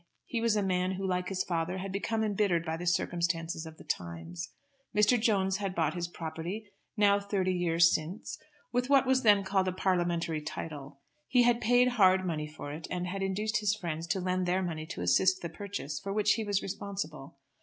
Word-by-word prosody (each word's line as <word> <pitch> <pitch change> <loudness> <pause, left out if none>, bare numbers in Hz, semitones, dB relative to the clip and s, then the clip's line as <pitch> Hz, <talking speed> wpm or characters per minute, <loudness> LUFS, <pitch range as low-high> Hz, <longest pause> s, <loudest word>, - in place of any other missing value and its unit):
He 230 - -2
was 230 -2 +2
a 205 - +1
man 185 0 0
who 190 +1 -4
like 180 -1 -1
his 190 -1 -1
father 170 +1 -2
had 190 +1 -4
become 220 +3 -1
embittered 200 -5 +1
by 160 -1 -2
the 175 +2 -5
circumstances 170 -1 0
of 160 0 -11
the - - -12
times. 85 0 -5 0.5
Mr. 210 +3 +4
Jones 195 -4 +2
had 195 -2 -3
bought 160 -2 +1
his 175 -1 -3
property, 175 +6 -6 0.3
now 205 -1 +5
thirty 195 -2 0
years 170 -1 +4
since, 165 +6 -4 0.3
with 250 +1 0
what 275 -1 +5
was 260 0 +3
then 205 -4 +5
called 190 -1 +1
a - - +1
parliamentary 175 -4 0
title. 145 -2 -7 0.3
He 250 -2 +4
had 240 0 +3
paid 245 +2 +4
hard 190 -6 +4
money 155 -4 -2
for 150 -1 -8
it, 155 +2 -7
and 180 0 -2
had 195 +2 -4
induced 210 +3 0
his 210 0 +1
friends 165 -3 -4
to 175 +3 0
lend 185 0 0
their 185 +2 +1
money 160 -3 -4
to - - -6
assist 185 - +3
the 170 - -3
purchase, 165 -5 -5
for 195 - -5
which 210 +1 +2
he 225 - +1
was 205 -2 0
responsible. 190 -8 -5
185 Hz, 205 wpm, -30 LUFS, 165-205 Hz, 0.5 s, now